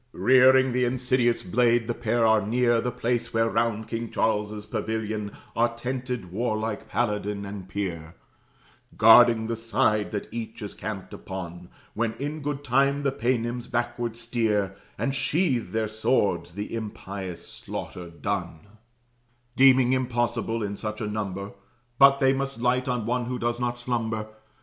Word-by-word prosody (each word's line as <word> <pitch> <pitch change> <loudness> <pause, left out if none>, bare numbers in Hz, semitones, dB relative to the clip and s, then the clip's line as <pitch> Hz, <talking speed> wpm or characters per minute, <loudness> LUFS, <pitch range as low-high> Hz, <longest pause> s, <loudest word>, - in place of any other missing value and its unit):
Rearing 130 0 +5
th' - - 0
insidious 125 -1 +1
blade, 120 +4 +2
the 120 - 0
pair 115 0 +1
are 110 -1 +5
near 120 +2 +2
The 125 - -1
place 120 0 -1
where 115 0 +3
round 115 -1 0
King 115 +1 -4
Charles's 105 -1 -1
pavilion 110 -1 -3 0.2
Are 115 0 +2
tented 125 -5 -4
warlike 110 0 -2
paladin 105 -2 -1
and 100 -2 -8
peer, 85 -5 -4 0.8
Guarding 115 +1 +7
the 115 +1 -2
side 110 -2 +1
that 105 -2 -4
each 115 -1 -6
is 105 - -6
camped 100 -3 -6
upon, 90 -2 -7 0.2
When 115 0 -1
in 145 +6 -5
good 145 0 -3
time 140 +2 +2
the 140 - +2
Paynims 120 -1 -1
backward 120 -1 -2
steer, 110 -4 0 0.2
And 135 - -1
sheathe 140 -3 +1
their 110 0 -1
swords, 100 -6 0
the 105 +2 -5
impious 100 -5 -6
slaughter 90 -1 -7
done; 85 -2 -4 0.9
Deeming 130 -1 +6
impossible, 120 -3 -1
in 100 0 -4
such 110 -1 -4
a 110 - -2
number, 100 -2 -4 0.5
But 140 0 +7
they 135 -1 +4
must 135 -2 -3
light 125 +2 +1
on 125 -3 -1
one 125 +1 0
who 125 +1 -3
does 120 0 -1
not 120 0 -1
slumber. 115 -3 -2
115 Hz, 150 wpm, -26 LUFS, 105-125 Hz, 0.9 s, Guarding